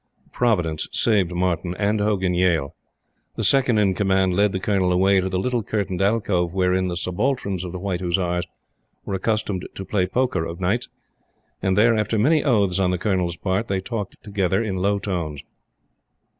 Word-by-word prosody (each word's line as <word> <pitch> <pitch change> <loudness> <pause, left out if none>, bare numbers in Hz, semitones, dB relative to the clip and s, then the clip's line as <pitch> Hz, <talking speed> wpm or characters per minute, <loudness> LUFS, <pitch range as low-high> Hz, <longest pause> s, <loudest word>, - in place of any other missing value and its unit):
Providence 90 -10 0
saved 100 -6 +2
Martyn 90 0 -1
and 105 +1 +1
Hogan 95 -3 +1
Yale. 85 -6 +1 0.6
The - - -3
Second 130 -4 +3
in 100 -3 +3
Command 95 -1 +1
led 100 +2 +3
the 95 - -2
Colonel 95 -2 +1
away 95 +2 +3
to 95 - -2
the 95 - -1
little 120 +5 0
curtained 100 -3 -2
alcove 95 -4 +1
wherein 95 0 +1
the 90 -1 -3
subalterns 100 0 -1
of 90 - -5
the 90 - -5
white 95 -1 -3
Hussars 90 -1 -1 0.6
were - - -4
accustomed 100 -1 -1
to 95 - -6
play 95 -3 0
poker 125 -3 0
of 85 +1 -6
nights; 105 +7 -1 0.7
and 95 0 +1
there, 115 +2 +5
after 110 +1 0
many 150 +8 +3
oaths 100 - +2
on 95 -2 +2
the 90 - 0
Colonel's 90 -3 -1
part, 95 +5 -1
they 95 -1 -1
talked 105 0 -5
together 100 -3 0
in 105 -5 -2
low 100 +2 +1
tones. 85 -8 -4
95 Hz, 175 wpm, -22 LUFS, 90-105 Hz, 0.7 s, there